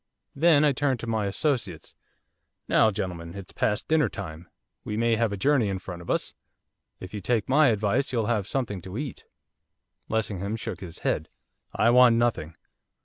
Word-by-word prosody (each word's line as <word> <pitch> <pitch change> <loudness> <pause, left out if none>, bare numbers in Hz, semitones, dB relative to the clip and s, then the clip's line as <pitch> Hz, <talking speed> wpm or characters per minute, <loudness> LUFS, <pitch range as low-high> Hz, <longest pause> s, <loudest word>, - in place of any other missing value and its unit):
Then 155 0 +5
I 145 - +5
turned 135 -2 0
to - - -5
my 110 -3 -1
associates. 100 - -2 0.7
'Now, 110 - +4
gentlemen, 90 -4 -5
it's 100 -2 -9
past 105 0 -1
dinner 155 -7 +3
time. 85 -4 -8 0.3
We 105 - -4
may 115 0 +2
have 115 -1 +1
a 100 - -3
journey 130 -1 +2
in 95 - -2
front 90 -2 -8
of 85 - -11
us. - - -1 0.7
If 95 +1 -9
you 105 - -4
take 115 0 0
my 145 +3 +5
advice 110 +2 +1
you'll 115 -4 0
have 105 -3 0
something 110 -8 -2
to 95 +4 -7
eat.' 140 -1 -6 0.8
Lessingham 105 -2 -2
shook 115 -5 -5
his 85 -3 -9
head. 80 - 0 0.5
'I 115 - +4
want 125 -1 +7
nothing. 115 -9 0
110 Hz, 175 wpm, -26 LUFS, 95-125 Hz, 0.8 s, want